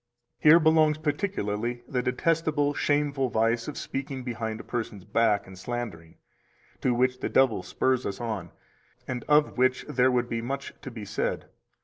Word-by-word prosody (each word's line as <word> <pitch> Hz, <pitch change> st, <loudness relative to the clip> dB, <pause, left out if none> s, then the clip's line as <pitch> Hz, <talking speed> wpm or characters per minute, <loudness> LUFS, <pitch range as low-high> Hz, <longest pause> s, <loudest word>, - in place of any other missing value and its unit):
264 150 Hz, -, +6 dB
Here 165 Hz, -, +9 dB
belongs 155 Hz, -1 st, +4 dB
particularly 120 Hz, -, -2 dB
the 125 Hz, -2 st, -1 dB
detestable, 145 Hz, +2 st, +1 dB
shameful 145 Hz, -3 st, +1 dB
vice 115 Hz, +1 st, +1 dB
of 150 Hz, -, -5 dB
speaking 135 Hz, -1 st, -4 dB
behind 115 Hz, -3 st, -4 dB
a -, -, -8 dB
person's 110 Hz, -5 st, -5 dB
back 105 Hz, -1 st, +2 dB
and 95 Hz, -1 st, -12 dB
slandering, 100 Hz, -8 st, -5 dB, 0.7 s
to 130 Hz, -, +2 dB
which 125 Hz, +1 st, +1 dB
the -, -, -2 dB
devil 130 Hz, -4 st, +3 dB
spurs 130 Hz, -1 st, 0 dB
us 100 Hz, -, -5 dB
on, 110 Hz, -7 st, -4 dB, 0.6 s
and 125 Hz, -2 st, -3 dB
of 150 Hz, -3 st, +3 dB
which 130 Hz, 0 st, +2 dB
there 130 Hz, +1 st, +3 dB
would 125 Hz, -1 st, +1 dB
be 115 Hz, -1 st, -2 dB
much 135 Hz, +4 st, -4 dB
to -, -, -7 dB
be 115 Hz, -4 st, -8 dB
said. 100 Hz, +1 st, -2 dB
125 Hz, 165 wpm, -27 LUFS, 115-145 Hz, 0.7 s, Here